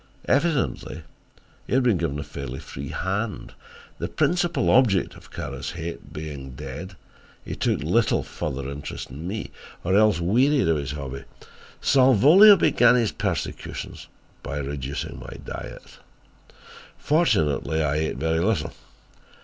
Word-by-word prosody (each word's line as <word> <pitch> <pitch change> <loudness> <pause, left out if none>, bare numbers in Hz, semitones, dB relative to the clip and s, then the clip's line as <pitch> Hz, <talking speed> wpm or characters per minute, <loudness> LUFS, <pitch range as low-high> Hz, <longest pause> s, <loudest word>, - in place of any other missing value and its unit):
Evidently 135 - 0 0.6
he - - 0
had 130 - +3
been 120 -6 +3
given 80 -4 -1
a 75 - -4
fairly 70 -3 -7
free 70 +1 -8
hand. 100 +3 -3 0.5
The - - -2
principal 175 -6 +1
object 110 -8 +3
of - - -15
Kara's 70 +1 -5
hate 85 0 -7
being 70 -4 -7
dead, 75 +7 -7 0.5
he - - -5
took - - 0
little - - +2
further 65 0 -5
interest 70 -1 -6
in 75 +6 -7
me, 105 +3 -4 0.3
or 95 +2 +1
else 105 -4 +4
wearied 125 - +3
of 80 -1 +3
his 70 0 -4
hobby. 70 -2 -6 0.6
Salvolio 145 - +7
began 125 -7 +5
his 115 -4 +2
persecutions 95 -7 -4 0.3
by 70 - -5
reducing 70 -1 -4
my - - -9
diet. - - -9 1.0
Fortunately 80 - +1
I 75 0 0
ate 80 -4 -1
very 80 +3 0
little. 90 -3 0
85 Hz, 135 wpm, -24 LUFS, -, 1.0 s, Salvolio